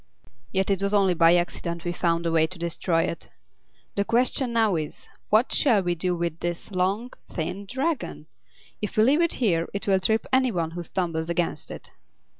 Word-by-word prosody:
"Yet 190 +1 +1
it 195 -1 0
was 200 +1 +1
only 195 -3 +4
by 165 0 +5
accident 170 -1 -2
we 175 - 0
found 170 -1 0
a 165 - +1
way 160 -1 +3
to 185 - -5
destroy 170 0 0
it. 165 - -5 0.6
The 200 - +1
question 245 +3 +1
now 225 -4 +3
is, 155 -2 -5 0.2
what 220 +5 +3
shall 225 -9 +4
we 175 -1 +1
do 180 +1 -1
with 170 -1 -3
this 175 +3 -4
long, 195 +6 0 0.2
thin 180 +4 -4
Dragon? 245 - -2 0.6
If 210 - -4
we 215 - +6
leave 285 +8 +4
it 335 - +2
here 170 -9 +1
it 200 - -3
will 190 -1 +4
trip 220 +4 +1
any 260 -1 +4
one 165 -4 -2
who 175 +1 -5
stumbles 165 -2 -2
against 170 0 -1
it." - - -9
185 Hz, 195 wpm, -25 LUFS, 170-215 Hz, 0.6 s, we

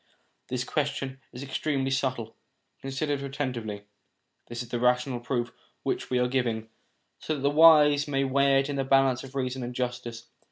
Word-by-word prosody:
This 125 -1 -2
question 135 -1 -2
is 125 +2 -8
extremely 135 0 -1
subtle: 130 -4 -1 0.5
consider 135 +2 -2
it 140 - -2
atten 140 -1 -3
tively. 105 -4 -6 0.6
This 120 +1 -5
is 120 - -15
a 120 - 0
rational 125 +1 +2
proof 120 0 -2 0.3
which - - -2
we 125 - +1
are 125 0 +2
giving, 120 -4 -1 0.5
so 155 - -2
that 140 - -6
the 140 +1 +2
wise 150 -2 +6
may 135 -1 +1
weigh 135 0 +3
it 135 - -4
in 145 -1 -3
the 135 - +1
balance 135 -1 +3
of 135 0 -11
reason 130 -1 -2
and 125 0 -5
justice. 120 -2 -4
130 Hz, 185 wpm, -27 LUFS, 125-140 Hz, 0.6 s, wise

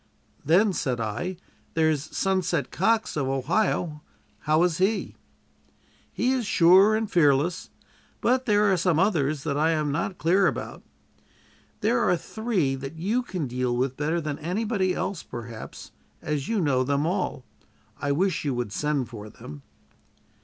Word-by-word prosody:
"Then," 185 +7 +4
said 125 -7 -1
I, 145 - -3 0.4
"there's 155 -3 +2
'Sunset' 175 0 -1
Cox, 225 +4 +1
of 140 -3 -1
Ohio. 150 - 0 0.4
How 155 +2 +2
is 175 -1 +1
he?" 200 +4 0 1.0
"He 250 - 0
is 260 -2 0
sure 190 +4 +6
and 220 0 -1
fearless. 165 -1 +2 0.5
But 255 +2 +1
there 205 -2 +4
are - - +2
some 175 -2 +2
others 155 -7 +1
that 145 -2 -1
I 160 +2 +3
am 150 -2 0
not 180 +5 -2
clear 185 +4 +3
about. - - -4 1.0
There - - +2
are - - +2
three 215 - -1
that 135 +3 -6
you 205 +10 0
can 185 - -4
deal 125 -1 -1
with 130 +1 0
better 155 +4 -1
than 150 -3 -4
anybody 185 +2 -1
else, 190 -3 -3
perhaps, 115 -2 -9 0.3
as 150 -2 -3
you 225 -2 0
know 135 -5 +2
them 140 +3 0
all. 180 -7 -2 0.5
I 140 +2 -1
wish 180 +3 0
you 140 -4 -1
would 120 -4 -3
send 145 +3 -1
for 105 -3 -9
them." 75 -8 -11
160 Hz, 155 wpm, -25 LUFS, 140-190 Hz, 1.0 s, sure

